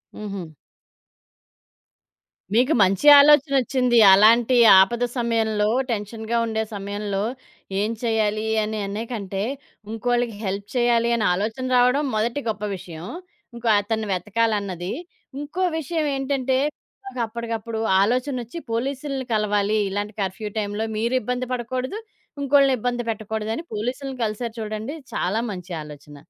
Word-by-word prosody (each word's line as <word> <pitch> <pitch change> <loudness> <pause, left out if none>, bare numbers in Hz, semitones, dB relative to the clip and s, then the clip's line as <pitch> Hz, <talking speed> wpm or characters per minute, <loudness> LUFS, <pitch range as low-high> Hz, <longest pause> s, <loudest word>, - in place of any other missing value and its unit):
హుహు. 195 -6 -6 2.0
మీకు 250 +7 +3
మంచి 195 +9 +1
ఆలోచనొచ్చింది. 275 -4 +4 0.2
అలాంటి 230 +5 +5 0.2
ఆపద 235 +6 +3
సమయంలో, 220 -3 +1 0.2
టెన్షన్‌గా 220 +2 -3
ఉండే 220 -1 -1
సమయంలో, 200 0 -3 0.6
ఏం 215 +2 0
చేయాలి 215 -2 0 0.2
అనే 215 0 -3
అనేకంటే 200 -2 -4 0.5
ఇంకోళ్ళకి 240 0 -1
హెల్ప్ 200 +1 -3
చేయాలి 240 -1 +3
అనే 220 -3 0
ఆలోచన 220 +7 -2
రావడం 250 +4 +3
మొదటి 230 +6 0
గొప్ప 210 -1 -4
విషయం. 170 -2 -9 0.5
ఇంకో 235 0 -5
అతన్ని 220 +1 -2
వెతకాలన్నది. 200 -2 -1 0.5
ఇంకో 300 +6 -3 0.2
విషయమేంటంటే, 275 -4 -1 0.7
అప్పడికప్పుడు 230 -1 -4 0.2
ఆలోచనొచ్చి 250 +4 -1
పోలీసులని 270 +3 -2
కలవాలి 210 0 +1
ఇలాంటి 205 +2 -3
కర్ఫ్యూ 195 +3 -3
టైమ్‌లో 205 +1 -2
మీరు 235 +4 0
ఇబ్బంది 250 +3 -3
పడకూడదు, 255 - -3 0.4
ఇంకోళ్ళని 275 -1 +4
ఇబ్బంది 245 +1 -2
పెట్టకూడదని 220 +4 -4
పోలీసులని 255 +5 -4
కలిసారు 220 +2 -4
చూడండి 215 +4 -4 0.2
చాలా 200 +5 0
మంచి 180 -1 -8
ఆలోచన. 150 0 -12
225 Hz, 105 wpm, -23 LUFS, 210-250 Hz, 2.0 s, అలాంటి